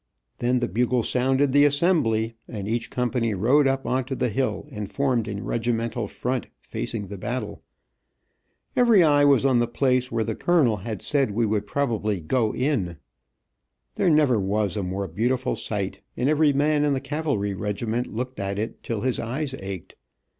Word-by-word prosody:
Then 125 +1 +1
the - - +1
bugle 120 +4 +1
sounded 130 +3 +1
the 145 +2 +5
"Assembly," 145 -8 +2
and 100 -4 -6
each 115 +1 -2
company 120 -3 0
rode 130 +9 +4
up 135 0 0
on 130 +1 0
to 135 +1 -4
the 125 - 0
hill 130 +5 -1
and 105 -2 -5
formed 130 -6 0
in 100 -1 -5
regimental 115 -1 -1
front 125 +3 -3
facing 105 -3 -5
the 100 0 -8
battle. 125 +5 -4 1.1
Every 235 -7 +6
eye 145 -2 +5
was 140 -2 +4
on 130 -3 +4
the 120 - +2
place 125 +1 +1
where 115 -1 0
the 110 - -2
colonel 140 -7 +2
had 105 +1 -6
said 140 -5 +1
we 115 +3 0
would 105 -1 -1
probably 110 -8 -1
"go 110 +7 0
in." 110 - -1 1.0
There - - +2
never 150 -7 +4
was 100 -1 0
a 105 - -1
more 95 +1 -3
beautiful 120 +9 0
sight, 100 -3 -4 0.2
and 125 - +1
every 155 0 +4
man 145 +1 +2
in 145 -1 +2
the - - -1
cavalry 140 -8 -2
regiment 110 +4 -2
looked 125 +3 -4
at 100 0 -2
it 110 +3 -4
till 115 -3 -3
his 130 0 0
eyes 130 +4 -3
ached. 95 -3 -7
120 Hz, 175 wpm, -25 LUFS, 105-135 Hz, 1.1 s, Every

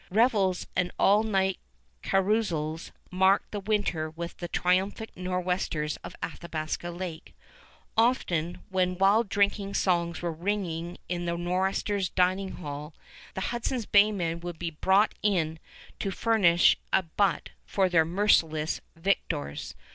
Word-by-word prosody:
Revels 205 -3 +2
and 180 -1 +1
all 205 +2 +5
night 190 -3 0 0.4
carousals 185 -6 0 0.2
marked 190 +2 +3
the 205 - -3
winter 195 -6 -1
with 170 +2 -7
the 175 - -5
triumphant 190 +6 0
Nor'westers 180 -4 -2
of - - -10
Athabasca 165 0 -4
Lake. 175 -2 -7 0.6
Often, 180 -8 +1
when 185 -1 0
wild 200 +3 +4
drinking 200 0 +1
songs 170 -2 0
were 170 - 0
ringing 175 -1 -3
in 175 -1 -3
the 170 0 -1
Nor'westers' 190 +2 0
dining 185 +1 +1
hall, 150 -1 -7 0.4
the 190 - -3
Hudson's 240 0 -2
Bay 205 +1 +5
men 170 -4 -2
would 175 -1 -6
be 170 0 -3
brought 190 +7 +3
in 165 -6 0 0.4
to 195 - -1
furnish 190 -5 +4
a 190 - +3
butt 185 +2 0 0.2
for 195 -2 +2
their 170 -3 +4
merciless 160 -3 +2
victors. 160 - -2
180 Hz, 130 wpm, -28 LUFS, 170-200 Hz, 0.6 s, all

